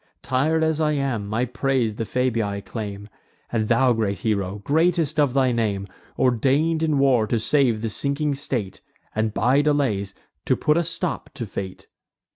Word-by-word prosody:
Tir'd 155 +6 +1
as 160 0 +1
I 150 -1 +2
am, 135 -8 -1
my 110 +4 0
praise 125 -3 -1
the 115 - -2
Fabii 115 -6 -1
claim; 105 -3 -6 0.4
And 110 -2 0
thou, 125 +2 +4
great 105 -3 -1
hero, 100 -3 -1
greatest 160 - +2
of 140 -3 +2
thy 130 -2 +3
name, 105 -4 -1 0.3
Ordain'd 135 +6 +2
in 155 -3 +1
war 130 -5 +3
to 115 +1 0
save 120 -2 +2
the 115 - -1
sinking 140 +6 0
state, 120 -8 -3 0.3
And, 110 0 0
by 125 +6 +3
delays, 130 -10 0 0.3
to - - +3
put 150 - +2
a 170 - +2
stop 170 +1 -3
to 120 -4 -4
fate! 95 -2 -7
125 Hz, 165 wpm, -23 LUFS, 110-145 Hz, 0.4 s, thou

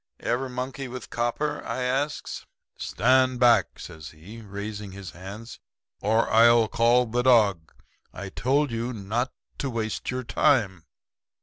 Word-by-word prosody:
"'Ever 130 +2 -1
monkey 130 +1 -5
with 125 -1 -8
copper?' 120 +6 -2
I 130 - -3
asks. 135 +4 -2 0.3
"'Stand 130 +3 +2
back!' 120 -2 +4
says 80 -1 -9
he, 95 +9 -12
raising 100 -1 -7
his 100 -2 -8
hand, 100 +6 -9 0.4
'or 110 +3 +2
I'll 115 0 +5
call 120 +2 +3
the 120 +2 -1
dog. 105 -10 +3 0.4
I 100 +1 -7
told 135 +6 +1
you 115 +2 -3
not 115 +4 -2 0.3
to 140 - -2
waste 110 -3 -3
your 130 0 -2
time.' 100 - +1
115 Hz, 135 wpm, -26 LUFS, 105-125 Hz, 0.4 s, I'll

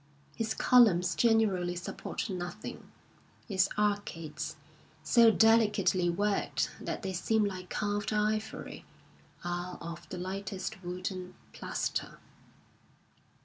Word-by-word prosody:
His 225 -1 -2
columns 185 -9 +5
generally 195 -3 +2
support 175 - -4
nothing; 180 +2 -6 0.6
his 190 -4 +2
arcades, 175 -9 -2 0.5
so 230 +7 +6
delicately 210 -5 +4
worked 200 +3 0
that - - -4
they 190 -1 -2
seem 215 +5 +2
like 185 -2 -5
carved 205 0 -1
ivory, 215 +1 -2 0.6
are 175 +1 -3
of 170 0 -8
the 185 - -5
lightest 190 +1 -5
wood 180 +2 -3
and 185 -1 -7 0.2
plaster. - - -3
190 Hz, 105 wpm, -31 LUFS, 175-215 Hz, 0.6 s, so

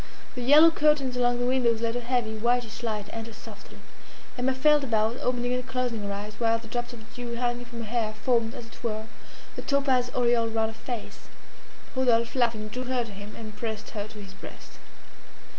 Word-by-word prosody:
The 250 - -5
yellow 300 +6 +8
curtains 300 -5 +3
along 245 -1 +2
the 245 - 0
windows 245 -3 +3
let 230 0 -1
a - - 0
heavy, 240 -2 0
whitish 235 0 0
light 215 -3 -2
enter 225 0 -6
softly. - - -12 0.6
Emma 255 +1 +1
felt 295 +2 +5
about, 225 -1 +1
opening 245 0 0
and 250 0 -2
closing 250 -3 -1
her 200 0 -3
eyes, 205 +1 -5
while 230 -1 +3
the 225 0 -11
drops 240 +2 -3
of 225 -2 -12
dew 240 -1 -5
hanging 245 0 -1
from 235 -1 -7
her - - -7
hair 220 -1 0
formed, 230 0 +1
as 235 - -7
it 230 - -15
were, 220 -2 -2 0.5
a - - -4
topaz 270 -3 +2
aureole 235 -2 +3
around 220 0 +1
her - - -8
face. 230 0 -7 0.7
Rodolphe, 235 -3 +3
laughing, 230 -4 +1
drew 250 +4 -4
her 255 -1 0
to 225 - -9
him, 205 +1 -9
and 215 -2 -8
pressed 215 -1 -4
her 205 -1 -4
to 215 - -13
his 195 -2 -9
breast. - - -12
235 Hz, 200 wpm, -27 LUFS, 220-250 Hz, 0.7 s, yellow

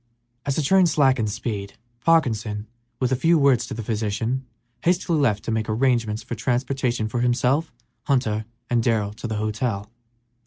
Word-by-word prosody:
As 140 - +1
the 155 - 0
train 190 +4 +5
slackened 130 -8 +3
speed 105 -2 -4 0.3
Parkinson, 110 -10 +2 0.3
with 125 -1 0
a - - +4
few 165 +6 +3
words 140 -4 +3
to - - -5
the 115 - -5
physician, 115 +4 -2 0.3
hastily 170 -2 +1
left 105 -8 +1
to - - -3
make 110 0 -1
arrangements 115 -2 +1
for - - -6
transportation 125 0 -1
for 120 +2 -2
himself, 125 +6 +1 0.3
Hunter, 110 -6 +1 0.2
and 120 -1 +2
Darrell 110 -3 +1
to 110 +1 -6
a - - -1
hotel. 110 -1 -2
120 Hz, 160 wpm, -23 LUFS, 110-135 Hz, 0.3 s, train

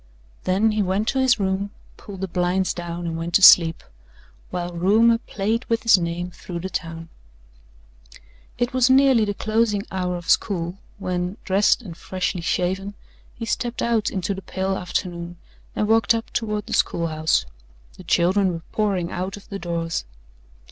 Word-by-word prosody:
Then 200 +4 +2
he 215 0 0
went 195 +3 0
to 270 - 0
his 255 -3 +3
room, 195 +1 -1 0.3
pulled 195 -2 -10
the 190 - -1
blinds 180 +1 0
down 175 0 -5
and 165 -1 -3
went 170 +1 -3
to 200 - +4
sleep, 165 -3 +8 0.7
while 175 0 -4
rumour 220 +7 +4
played 220 +1 -2
with 230 -1 -1
his 230 -5 +6
name 175 +1 -3
through 175 -1 -7
the 190 +1 -5
town. 165 0 -5 1.5
It 245 +1 -1
was 255 -1 +3
nearly 265 -4 +5
the 205 -1 -3
closing 215 0 0
hour 180 -1 -2
of 175 - -10
school 180 -3 0 0.2
when, 180 0 -3
dressed 200 +5 +2
and 175 -6 -8
freshly 185 0 -3
shaven, 190 +4 -1 0.4
he 230 - -5
stepped 240 +2 -2
out 230 -3 +1
into 190 +1 -2
the 195 - -7
pale 190 0 -2
afternoon 175 -1 -4 0.4
and 210 - 0
walked 225 +1 +4
up 225 0 -5
toward 210 -2 -2
the - - -6
schoolhouse. 160 - +1 0.5
The - - -12
children 185 +2 +2
were 165 -1 -6
pouring 195 -5 0
out 185 +3 -4
of 200 - -16
the 200 - -5
doors. 170 - -3
190 Hz, 165 wpm, -23 LUFS, 175-215 Hz, 1.5 s, sleep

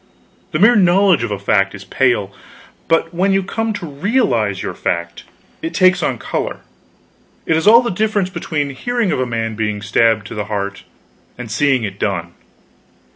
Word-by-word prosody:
The - - 0
mere 215 +8 +5
knowledge 190 - +4
of 115 - -2
a 100 - -2
fact 100 0 +1
is 100 - -10
pale; 100 -1 0 0.5
but 165 +1 +1
when 190 +3 +1
you 195 0 +2
come 225 +4 -2
to 195 - -6
realize 140 - 0
your - - -4
fact, 85 0 -3 0.4
it 165 +1 -5
takes 185 0 +4
on 130 -6 -1
color. - - -4 0.8
It 160 - +2
is 160 +5 0
all 230 +3 +8
the 240 - -2
difference 205 -1 0
between 145 -5 -3
hearing 235 - -1
of - - -1
a 130 - 0
man 115 -1 -2
being 105 -1 -2
stabbed 110 0 +2
to - - -8
the 105 -2 -4
heart, 100 -1 -4 0.5
and 120 -3 -8
seeing 130 +1 +2
it 100 -1 -5
done. 85 -4 -2
135 Hz, 180 wpm, -18 LUFS, -, 0.8 s, all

